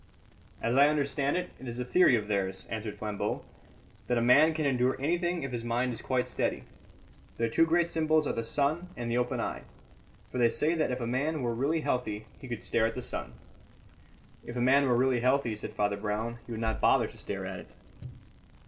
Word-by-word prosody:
"As 115 +2 +1
I 140 +2 +7
understand 145 0 0
it, 180 0 -3
it 130 - -9
is 120 0 -5
a 125 - -3
theory 135 0 +5
of 105 -3 -2
theirs," 95 -2 -2
answered 110 -2 -4
Flambeau, 105 -1 -3 0.6
"that 125 - +1
a - - +3
man 145 +7 +5
can 155 -1 -1
endure 130 -1 +1
anything 175 +3 0
if 135 - -4
his 120 -2 -4
mind 120 +1 0
is - - -5
quite 130 -1 0
steady. - - -2 0.7
Their 115 0 0
two 165 +8 +3
great 170 +1 +3
symbols 155 -2 +2
are - - -1
the 115 - -2
sun 145 +9 0
and 120 -1 -3
the 120 - +1
open 125 0 -1
eye; - - -3 0.7
for 125 - -3
they 120 -1 +5
say 150 +7 +1
that 160 -2 +1
if 125 0 -2
a - - -1
man 140 +5 -1
were 120 -1 0
really 145 +7 0
healthy 110 -6 -2
he 130 - -10
could 120 -3 -5
stare 110 -1 +2
at 115 - -5
the 125 - -4
sun." - - -5 1.1
"If 120 - -8
a - - -2
man 135 +3 +4
were 120 -2 +3
really 130 0 +3
healthy," 125 -1 +2
said 105 - -7
Father 100 -1 0
Brown, 110 +3 -3
"he - - -8
would 110 - -4
not 110 -1 -1
bother - - +4
to - - -10
stare - - -5
at - - -5
it." - - -11
125 Hz, 220 wpm, -30 LUFS, 115-145 Hz, 1.1 s, I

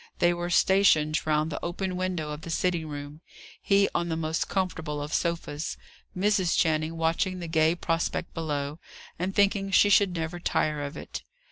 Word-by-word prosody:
They 175 0 +3
were 175 0 -3
stationed 165 -5 +3
round 155 +1 +1
the 145 - -5
open 180 +2 -3
window 180 -4 -2
of 150 +1 -6
the 165 - -8
sitting 170 -1 0
room, 145 +1 -7 0.4
he 200 0 +4
on 170 0 -1
the 160 - -1
most 160 0 -2
comfortable 165 -6 -2
of 145 +1 -5
sofas, 165 -3 -2 0.4
Mrs. 190 -2 +2
Channing 160 0 +1
watching 165 +3 0
the 175 -2 -5
gay 160 0 +3
prospect 165 0 -2
below, 150 -2 -3 0.4
and 185 +2 -2
thinking 200 -1 +2
she 205 +1 +5
should 195 -2 +4
never 165 +1 -3
tire 150 -3 0
of 140 0 -5
it. - - -7
165 Hz, 170 wpm, -27 LUFS, 155-185 Hz, 0.4 s, she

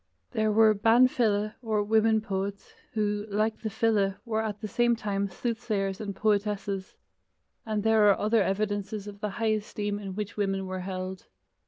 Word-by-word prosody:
There 220 -3 +1
were 220 0 +6
ban 225 +5 +5
file, 215 -4 +1
or 215 -3 0
women 220 +1 +3
poets, 200 -1 -4 0.2
who, 210 -1 -1
like 215 +2 0
the 220 - -2
file, 205 -3 +1
were 220 -2 0
at 210 -2 -3
the 215 - -4
same 240 +2 +2
time 200 -3 -2
soothsayers 205 -2 -2
and 200 -2 -4
poetesses, 205 -2 -1 0.7
and 215 -2 -1
there 220 -2 +5
are 200 - +4
other 215 +1 +2
evidences 205 +1 -1
of 205 -1 -9
the 210 0 -2
high 220 +2 0
esteem 205 -1 -3
in 195 -2 -6
which 210 0 -5
women 195 -1 0
were 185 0 -4
held. 185 0 -5
210 Hz, 170 wpm, -28 LUFS, 200-220 Hz, 0.7 s, were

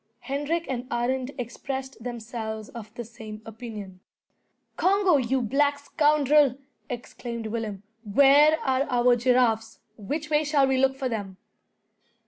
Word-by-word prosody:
Hendrik 290 +5 -2
and 250 -1 -4
Arend 250 +2 -1
expressed 260 +1 -5
themselves 220 -2 -5
of 220 -3 -9
the 240 - -6
same 215 -1 -9
opinion. 215 -4 -8 0.8
"Congo, 380 -3 +3
you 260 0 0
black 285 +5 +2
scoundrel!" 295 -2 +3 0.3
exclaimed 240 -1 -6
Willem, 215 -3 -4 0.2
"where 280 +8 +5
are 265 0 +1
our 245 -1 +4
giraffes? 240 -2 +2 0.2
Which 295 +9 -4
way 300 0 +3
shall 290 -2 +3
we 265 -1 +2
look 265 0 +3
for 270 -1 -2
them?" 200 -5 -4
250 Hz, 125 wpm, -26 LUFS, 225-280 Hz, 0.8 s, where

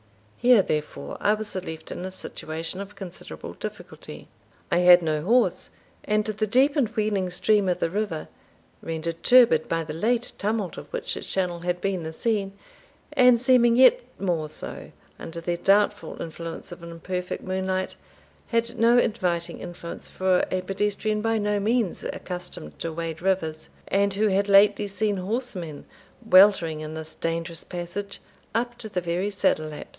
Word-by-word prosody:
Here, 240 -5 +6
therefore, 150 -3 -3
I 210 - +3
was 215 0 -6
left 170 -4 -6
in - - -5
a 185 - -3
situation 165 -1 -5
of 200 +1 -9
considerable 185 -3 -9
difficulty. - - -9 0.4
I - - +4
had 180 0 +7
no 155 -2 0
horse, 235 +9 +2 0.3
and 210 0 +1
the 215 0 -1
deep 265 +7 +3
and 280 -6 +3
wheeling 210 -4 0
stream 200 +2 +2
of 180 - 0
the 165 - 0
river, 200 -6 -2 0.5
rendered 165 +1 -4
turbid 235 -11 +5
by 165 0 0
the 155 - -6
late 230 +8 0
tumult 210 -3 -1
of - - -9
which - - -3
its - - -7
channel 180 -2 -1
had 175 +1 -2
been 190 -1 -1
the 160 0 -5
scene, 200 +2 -1 0.6
and 250 -2 +6
seeming 245 -2 +5
yet 260 - +7 0.2
more 170 -5 -1
so - - -7 0.3
under 170 +1 -6
the 170 +1 -2
doubtful 205 +3 +2
influence 165 +1 -7
of 175 - -9
an 170 - -9
imperfect 180 +2 -4
moonlight, 185 0 -2 0.5
had 230 0 -1
no 235 +2 +5
inviting 180 -8 0
influence 170 -1 -8
for 185 -1 +1
a 185 - -1
pedestrian 210 +2 -1
by 225 0 +1
no 210 -1 0
means 220 -2 0
accustomed 180 - -6
to 165 - -3
wade 165 0 -5
rivers, 165 -5 -1 0.2
and 200 0 +2
who 215 +1 +2
had 200 +1 +1
lately 205 +1 +5
seen 205 0 -1
horsemen 185 - -4 0.4
weltering, 185 -5 +6
in 155 0 -6
this 160 0 -7
dangerous 165 0 -3
passage, 180 +3 -6 0.4
up 240 +1 0
to 220 -2 -6
the 185 -3 -2
very 175 +3 -1
saddle 155 -6 +1
laps. 150 -1 -8
190 Hz, 165 wpm, -25 LUFS, 170-215 Hz, 0.6 s, had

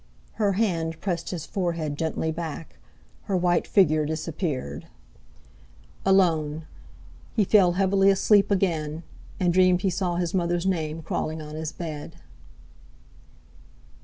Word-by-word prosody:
Her 200 -2 +3
hand 170 -6 -1
pressed 175 -4 -3
his 170 -5 -5
forehead 170 -6 -2
gently 160 +1 -2
back; 165 -1 -6 0.5
her 195 -3 0
white 175 -1 +1
figure 155 -6 +4
disappeared. 155 - -4 1.2
Alone! 160 -5 +2 0.7
He 215 - +3
fell 185 -3 +4
heavily 195 +1 +3
asleep 195 +1 +4
again, 165 -5 0 0.4
and 180 -2 +2
dreamed 185 0 +4
he 190 - +2
saw 180 -1 -1
his 175 -1 -2
mother's 175 -1 0
name 160 -4 -1
crawling 160 +1 -3
on 150 -1 -8
his 155 0 -4
bed. 155 -4 -7
170 Hz, 120 wpm, -25 LUFS, 155-190 Hz, 1.2 s, figure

